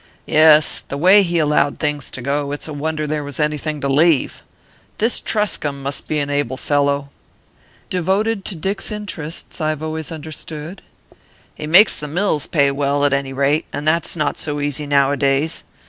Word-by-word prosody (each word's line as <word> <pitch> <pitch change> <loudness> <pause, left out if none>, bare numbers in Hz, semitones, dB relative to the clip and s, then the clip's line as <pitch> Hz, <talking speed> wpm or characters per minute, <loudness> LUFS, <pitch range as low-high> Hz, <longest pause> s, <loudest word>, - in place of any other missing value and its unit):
"Yes. 155 0 +5
The 140 - -4
way 185 +7 +6
he 175 -3 0
allowed 150 -2 +2
things 150 -2 -2
to 125 - -8
go, 140 +1 -1
it's 145 - -4
a 155 - -6
wonder 155 +1 -3
there 150 0 -2
was 145 +1 -4
anything 150 0 -1
to 140 - -1
leave. 150 +1 +2 0.6
This 225 +3 +2
Truscomb 150 -10 -1
must 140 +1 -4
be 155 - -1
an 145 -1 -1
able 145 -3 -1
fellow." 140 -1 0 0.8
"Devoted 195 +4 0
to 195 - -3
Dick's 195 +6 -3
interests, 175 -7 -6
I've 155 0 -1
always 160 0 -4
understood." 155 +2 -7 0.7
"He 150 - -6
makes 190 +7 +6
the 150 - -5
mills 160 -2 0
pay 140 -4 +2
well, 140 +1 0
at 140 - +2
any 140 -1 -1
rate, 140 +3 +1
and 150 - -4
that's 165 +2 +1
not 150 -3 -1
so 145 -1 -2
easy 145 0 -1
nowadays. 140 +2 +1
150 Hz, 170 wpm, -19 LUFS, 145-160 Hz, 0.8 s, way